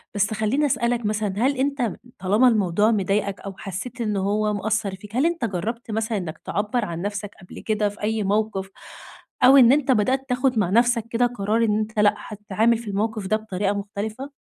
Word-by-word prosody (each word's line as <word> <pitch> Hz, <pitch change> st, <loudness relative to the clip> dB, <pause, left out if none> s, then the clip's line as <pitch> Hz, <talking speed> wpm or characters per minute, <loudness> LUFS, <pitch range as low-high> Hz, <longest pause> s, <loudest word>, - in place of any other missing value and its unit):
بس 205 Hz, +1 st, +1 dB
خلّيني 220 Hz, +8 st, +1 dB
أسألك 240 Hz, -3 st, 0 dB
مثلًا، 210 Hz, -1 st, -1 dB
هل 260 Hz, +5 st, +1 dB
أنت 265 Hz, -3 st, 0 dB, 0.3 s
طالما 205 Hz, +7 st, +3 dB
الموضوع 210 Hz, -2 st, +3 dB
مضايقك 200 Hz, -1 st, 0 dB
أو 195 Hz, -, -7 dB
حسّيت 215 Hz, +6 st, -6 dB
إن 210 Hz, -3 st, -1 dB
هو 210 Hz, +2 st, 0 dB
مأثر 205 Hz, -1 st, -1 dB
فيك، 210 Hz, +3 st, -12 dB
هل 265 Hz, +5 st, +2 dB
أنت 335 Hz, -7 st, 0 dB
جرّبت 225 Hz, +4 st, -4 dB
مثلًا 220 Hz, 0 st, -1 dB
إنّك 175 Hz, -5 st, -5 dB
تعبر 210 Hz, +3 st, -1 dB
عن 170 Hz, -3 st, -5 dB
نفسك 205 Hz, 0 st, -4 dB
قبل 180 Hz, -, -11 dB
كده 210 Hz, -1 st, 0 dB
في 205 Hz, -, -13 dB
أي 215 Hz, 0 st, 0 dB
موقف؟ 200 Hz, -1 st, -1 dB, 0.7 s
أو 265 Hz, +2 st, +8 dB
إن 245 Hz, -3 st, +8 dB
أنت 280 Hz, -1 st, +3 dB
بدأت 260 Hz, +4 st, +1 dB
تاخد 250 Hz, -1 st, +1 dB
مع 190 Hz, -4 st, +1 dB
نفسك 235 Hz, +2 st, +3 dB
كده 235 Hz, +1 st, +2 dB
قرار 230 Hz, -1 st, 0 dB
إن 210 Hz, -1 st, +1 dB
أنت 215 Hz, 0 st, -3 dB
لأ، 210 Hz, 0 st, +4 dB
هتتعامل 210 Hz, +2 st, 0 dB
في 230 Hz, 0 st, -10 dB
الموقف 210 Hz, 0 st, -2 dB
ده 215 Hz, -, +2 dB
بطريقة 205 Hz, -2 st, -2 dB
مختلفة؟ 210 Hz, +6 st, -5 dB
215 Hz, 190 wpm, -23 LUFS, 205-235 Hz, 0.7 s, أو